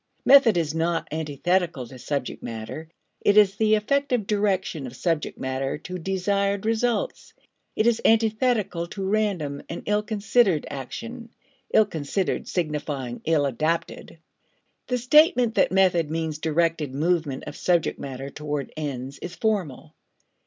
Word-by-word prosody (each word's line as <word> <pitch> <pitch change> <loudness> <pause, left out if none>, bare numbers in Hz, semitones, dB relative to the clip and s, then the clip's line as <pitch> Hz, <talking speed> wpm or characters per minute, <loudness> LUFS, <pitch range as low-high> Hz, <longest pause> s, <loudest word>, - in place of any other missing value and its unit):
Method 260 -8 +7
is 155 -3 0
not 165 +1 -1
antithetical 160 0 -1
to 125 +2 -12
subject 140 0 -3
matter; 115 +8 -7 0.3
it 205 - +4
is 205 -2 +6
the 215 -1 +3
effective 250 +1 0
direction 190 -8 0
of 125 - -10
subject 165 +1 -1
matter 130 +2 -2
to 180 +4 -7
desired 200 +2 0
results. 240 - -1 0.4
It 215 - +1
is 235 -1 +3
antithetical 220 -5 +2
to 195 +2 -5
random 190 -9 -1
and 170 - -6
ill 210 0 +1
considered 210 -4 +2
action, 230 - -7 0.4
ill 220 - +5
considered 170 +1 -2
signifying 145 -7 -3
ill 155 -3 +2
adapted. 155 +5 -2 0.7
The 250 - 0
statement 250 - +4
that 200 - +3
method 180 -5 +3
means 160 -1 -3
directed 160 -3 0
movement 155 -3 0
of - - -7
subject 175 -1 +1
matter 135 0 -6
towards 150 -1 -4
ends 140 -3 -5
is 175 0 -7
formal. 165 - -2
170 Hz, 135 wpm, -25 LUFS, 150-210 Hz, 0.7 s, Method